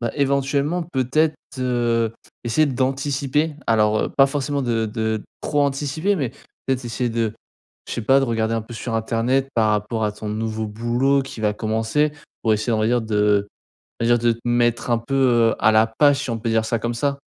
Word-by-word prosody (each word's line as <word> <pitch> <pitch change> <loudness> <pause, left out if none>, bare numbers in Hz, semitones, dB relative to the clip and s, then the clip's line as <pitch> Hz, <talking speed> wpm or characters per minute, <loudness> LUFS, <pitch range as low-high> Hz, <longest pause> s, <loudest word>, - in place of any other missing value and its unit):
bah, 120 -1 -2
éventuellement 140 +4 0
peut-être, 155 +1 +1 0.2
heu, 120 -3 0 0.3
essayer 120 +7 +3
d'anticiper. 140 +3 -1
Alors, 110 -1 +3
heu, - - -3
pas 135 - +7
forcément 140 0 -2
de 115 -3 0
de 110 0 -2 0.2
trop 145 -1 0
anticiper 145 +7 0
mais 140 - -2 0.4
peut-être 130 -1 -1
essayer 120 +1 -2
de 115 -2 -1 0.6
je - - -4
sais 120 - -3
pas, 135 +5 +5
de - - +2
regarder 115 -2 0
un 115 - -1
peu 120 +2 -10
sur 115 +1 -4
internet 115 +4 0
par 110 -2 +3
rapport 105 +2 -1
à 105 - +1
ton 105 +1 -7
nouveau 110 +1 -3
boulot 120 +6 +1
qui 130 -4 -9
va 105 -1 +1
commencer 110 +8 0 0.3
pour 110 - +3
essayer 110 +3 -1
on 110 - +1
va 110 - +1
dire 120 +1 +2
de 105 -2 +1 0.5
va - - +1
dire 120 0 +4
de 120 0 +2
te 115 - -13
mettre 120 0 +1
un 120 - +3
peu, 125 +4 -4
heu, 120 -4 +3
à 110 - +4
la 110 0 +5
page, 140 +5 +3
si 135 - -5
on 115 - -3
peut 115 +1 -2
dire 110 -1 +1
ça 115 +1 -1
comme 120 +2 -2
ça? 140 +3 -1
120 Hz, 210 wpm, -22 LUFS, 110-135 Hz, 0.6 s, pas